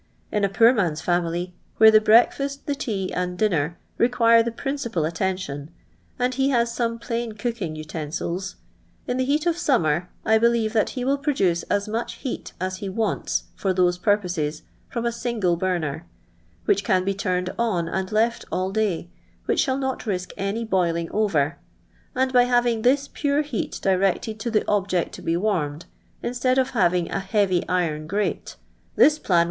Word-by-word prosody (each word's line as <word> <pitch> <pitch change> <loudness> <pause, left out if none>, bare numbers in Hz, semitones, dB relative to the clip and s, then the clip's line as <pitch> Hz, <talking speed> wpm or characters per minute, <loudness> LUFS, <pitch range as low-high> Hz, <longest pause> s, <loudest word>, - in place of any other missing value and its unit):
In 210 - 0
a 200 - +3
pnor 230 +5 +5
man's 170 -8 0
family, 175 0 -1 0.3
wlfre 220 0 +9
th^^ 215 - +8 0.3
breakfa^t. 280 0 -5
the 290 - 0
tea 210 -9 -3
aod 180 0 -2
dinner, 175 -6 0 0.2
require 230 -1 +5
the 235 +1 -1
principal 235 - -2
attention, 165 -4 -3 0.5
and 250 +1 0
he 270 +1 +1
has 235 -3 +2
sumo 230 -1 -1
plain 235 -1 -3
cooking 210 -7 -3
utonftils. 160 +4 -4 0.5
in 245 - -2
the 260 - +1
heat 295 +4 +1
of 340 - +3
»umnier 175 - +1 0.2
I 220 0 +4
bolieve 230 -1 +2
that 220 -2 +2
he 250 - -1
will 275 +1 +1
produce 195 - +1
as 205 0 0
much 225 +2 -3
heat 260 - -6
as 185 +1 -2
he 195 +1 -5
wants 215 +2 -1
for 190 -2 -1
those 180 -1 +2
purpo«ies 175 -7 0 0.3
from 235 -1 -3
a 235 - +1
single 230 -7 0
burner, 170 -3 -2 0.6
which 405 - +2
can 185 -5 +2
be 195 - +1
tuntod 185 -1 -2
on 190 -8 0
and 190 +2 -3
left 225 +2 +1
ail 185 +1 -1
day, 200 -5 -1 0.4
which - - +1
shall 265 -2 +2
not 265 -3 -3
ri:«k 185 -3 -3
any 205 +4 -2
boiliiig 170 -5 0
over, 165 -9 +1 0.6
and 260 +1 +1
by 245 -1 +6
having 240 -2 +2
this 275 +4 +3
pure 290 +1 0
heat 285 -7 -4
directed 195 +3 +1
ti 235 - -2
ilie 220 -2 +1
objeit 195 -4 0
to - - -9
be 165 - 0
H'armeJ, 170 -6 -1 0.4
instead 250 +1 0
of 260 0 +2
havini: 180 -6 +2
a - - -1
heavy 195 -2 +1
iron 160 -4 -1
grate, 205 +4 -2 0.4
this 305 0 +5
plan 185 - 0
wouhl. - - +6
205 Hz, 175 wpm, -24 LUFS, 180-235 Hz, 0.6 s, wlfre